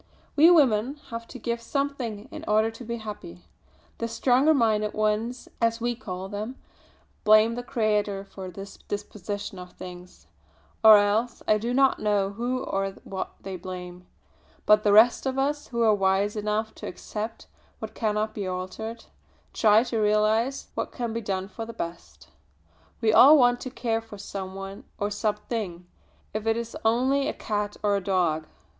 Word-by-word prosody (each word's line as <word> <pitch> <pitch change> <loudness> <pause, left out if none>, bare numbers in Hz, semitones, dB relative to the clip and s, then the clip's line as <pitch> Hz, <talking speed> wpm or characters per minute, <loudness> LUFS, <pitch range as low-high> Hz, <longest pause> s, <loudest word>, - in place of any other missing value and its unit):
We 310 +3 +7
women 265 -6 +4 0.2
have 230 0 -6
to - - -9
give 235 0 -3
something 250 -5 -3
in - - -8
order 215 +1 +3
to 225 +2 -11
be 235 0 -4
happy. 205 - -8 0.6
The 230 - -1
stronger 250 +5 +3
minded 215 -6 +2
ones, 215 +3 -1
as 230 0 +2
we 240 +1 -1
call 190 -6 -6
them, 210 +6 -5 0.7
blame 215 +2 +6
the 245 - -4
Creator 210 -5 0
for 190 -1 -8
this 195 +3 -9
disposition 205 -1 -5
of 180 0 -10
things 180 0 -11 0.6
or 220 -1 +10
else 210 +4 +1
I 215 - +4
do 235 +3 -2
not 270 +1 +3
know 205 -2 +1
who 245 +4 -2
or 195 0 -2
what 190 -1 -5
they 190 -1 -6
blame; 180 0 -8 0.6
but 210 0 +6
the 210 - +3
rest 225 +5 +6
of 265 0 -2
us, 290 +2 -1
who 235 -1 -1
are 220 -1 +5
wise 195 +1 +1
enough 215 +1 -1
to - - -5
accept 215 +1 -6 0.3
what - - -7
cannot 215 -1 -1
be 200 -3 -4
altered, 185 +5 -5 0.5
try 215 0 +5
to 235 -2 -2
realise 215 +5 +1
what - - -3
can 235 -2 -4
be 230 - -2
done 190 -2 -3
for 225 +2 -7
the 230 +1 -7
best. 170 0 -7 0.7
We 220 -2 +3
all 295 +7 +9
want 245 -2 +4
to 255 - -6
care 230 -2 -1
for 225 -2 -11
some 195 -1 -6
one 195 0 -7
or 205 +1 -2
something, 210 -3 -3 0.5
if 215 +1 -3
it 225 0 +2
is 235 0 -5
only 260 +5 +2
a - - -1
cat 210 -1 -3
or 205 -1 +3
a 200 - -2
dog. 170 -5 0
215 Hz, 170 wpm, -26 LUFS, 200-235 Hz, 0.7 s, or